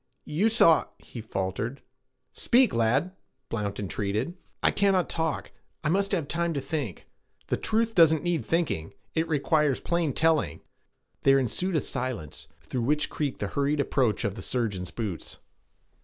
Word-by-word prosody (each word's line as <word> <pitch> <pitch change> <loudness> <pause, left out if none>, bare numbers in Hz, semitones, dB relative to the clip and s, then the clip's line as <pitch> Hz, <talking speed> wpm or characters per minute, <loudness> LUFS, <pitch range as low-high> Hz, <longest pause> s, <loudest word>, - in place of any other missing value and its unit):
'You 180 +9 +2
saw' 170 -8 +5
he 115 - -9
faltered. 105 +5 -3 0.5
'Speak, 250 0 +3
lad!' 130 +11 +1 0.3
Blount 105 -3 -3
entreated. 105 - -2 0.3
'I - - +5
cannot 195 -3 +2
talk. 160 -3 -2 0.3
I 150 - +1
must 195 +3 +2
have 170 -8 0
time 170 0 -1
to - - 0
think.' 135 - -4 0.4
'The - - -1
truth 225 +1 0
doesn't 160 -4 +5
need 175 -6 0
thinking. 160 - -1 0.2
It 160 0 0
requires 150 -2 +2
plain 170 -3 0
telling.' 160 - +2 0.6
There 135 0 +5
ensued 165 - 0
a 155 - +3
silence, 125 - -5 0.2
through 125 - -3
which 150 +5 +1
creaked 145 -4 -3
the 100 - -1
hurried 140 +4 0
approach 130 -6 +1
of 100 - 0
the - - -8
surgeon's 100 -8 -2
boots. 100 -7 -5
145 Hz, 150 wpm, -27 LUFS, 115-165 Hz, 0.6 s, saw